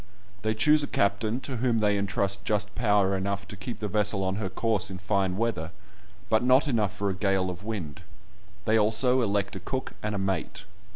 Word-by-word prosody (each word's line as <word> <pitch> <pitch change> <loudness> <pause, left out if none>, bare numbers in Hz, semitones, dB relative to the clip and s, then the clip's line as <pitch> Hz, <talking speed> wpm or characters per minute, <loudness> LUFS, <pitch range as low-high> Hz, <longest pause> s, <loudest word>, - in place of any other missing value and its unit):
They 110 +1 0
choose 150 +7 +4
a 145 - -1
captain, 105 +5 0
to 130 -2 -5
whom 120 -1 +1
they 105 -1 +3
entrust 100 0 -1
just 105 -1 0
power 105 -4 +2
enough 100 +1 -2
to - - -7
keep 100 +5 -6
the 105 - -2
vessel 105 -1 +1
on 95 +1 -1
her 100 -3 -2
course 105 0 0
in 95 - -6
fine 95 -1 0
weather, 105 -8 -1 0.6
but 110 +1 +3
not 130 +2 +5
quite 150 - -3
enough 105 -5 0
for 100 -1 0
a - - -4
gale 95 -1 +1
of 90 +2 -9
wind; 95 -9 -5 0.6
they 110 +1 +4
also 115 +5 +3
elect 100 -3 0
a - - -4
cook 130 +8 -4
and 105 -1 -2
a - - -1
mate. 95 -3 -2
105 Hz, 210 wpm, -27 LUFS, 95-110 Hz, 0.6 s, not